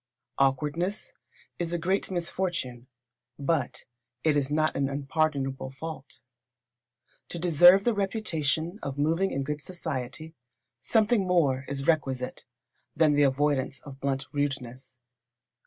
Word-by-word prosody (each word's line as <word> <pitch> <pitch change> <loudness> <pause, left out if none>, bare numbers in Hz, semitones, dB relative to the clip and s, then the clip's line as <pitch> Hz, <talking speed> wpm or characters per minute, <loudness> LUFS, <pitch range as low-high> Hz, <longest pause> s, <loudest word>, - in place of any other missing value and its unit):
Awkwardness 150 - 0 0.5
is 170 -1 -2
a - - +1
great 185 +4 0
misfortune, 170 -9 -2 0.5
but 140 -2 -1 0.4
it 155 -2 +3
is 140 -2 +1
not 155 +1 +1
an 140 -1 0
unpardonable 140 -2 -1
fault. 135 0 -8 1.1
To - - -4
deserve 175 +3 +7
the 240 - +2
reputation 175 -4 -1
of 140 0 -5
moving 165 +6 +2
in 135 - -2
good 150 +1 -3
society, 155 -2 -5 0.5
something 210 - +2
more 140 -7 +2
is 135 -1 -4
requisite 135 -6 0 0.5
than 155 -1 +4
the 145 - +3
avoidance 140 -1 +1
of 135 -2 -11
blunt 135 -1 -1
rudeness. 135 -3 -4
150 Hz, 120 wpm, -28 LUFS, 135-170 Hz, 1.1 s, deserve